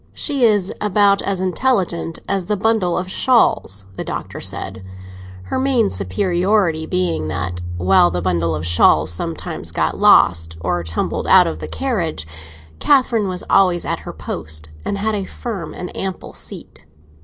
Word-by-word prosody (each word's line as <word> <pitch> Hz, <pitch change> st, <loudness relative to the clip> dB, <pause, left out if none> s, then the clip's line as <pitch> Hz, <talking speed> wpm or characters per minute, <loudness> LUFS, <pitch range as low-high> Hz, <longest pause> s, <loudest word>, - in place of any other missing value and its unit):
"She 280 Hz, -5 st, +1 dB
is 205 Hz, -4 st, +2 dB
about 200 Hz, -1 st, +3 dB
as 195 Hz, -2 st, -2 dB
intelligent 185 Hz, -5 st, 0 dB
as 195 Hz, -3 st, -1 dB
the 210 Hz, -, 0 dB
bundle 205 Hz, -4 st, +1 dB
of 180 Hz, -, -2 dB
shawls," 210 Hz, -, +2 dB
the -, -, -3 dB
Doctor -, -, -6 dB
said; 95 Hz, -, -5 dB, 0.6 s
her 95 Hz, -, -3 dB
main 260 Hz, -5 st, +2 dB
superiority 175 Hz, -, 0 dB
being 80 Hz, -4 st, -1 dB
that 90 Hz, +2 st, -3 dB, 0.2 s
while 90 Hz, 0 st, +4 dB
the 90 Hz, +1 st, -2 dB
bundle 85 Hz, -2 st, 0 dB
of 75 Hz, +2 st, -4 dB
shawls 80 Hz, -2 st, +4 dB
sometimes -, -, -4 dB
got -, -, -1 dB
lost, 80 Hz, -1 st, +4 dB
or 90 Hz, 0 st, -1 dB
tumbled 80 Hz, 0 st, -3 dB
out -, -, +7 dB
of 80 Hz, -, -3 dB
the 75 Hz, -, -6 dB
carriage, 80 Hz, 0 st, -2 dB, 0.5 s
Catherine 250 Hz, -7 st, +3 dB
was 180 Hz, -1 st, -3 dB
always 180 Hz, -3 st, +3 dB
at -, -, -2 dB
her -, -, -8 dB
post, 75 Hz, 0 st, -5 dB
and 200 Hz, -, -2 dB
had 215 Hz, +2 st, -1 dB
a 200 Hz, -2 st, -2 dB
firm 200 Hz, -4 st, -6 dB
and 180 Hz, -, -7 dB
ample 190 Hz, -2 st, -5 dB
seat. 75 Hz, -, -6 dB
175 Hz, 155 wpm, -19 LUFS, -, 0.6 s, out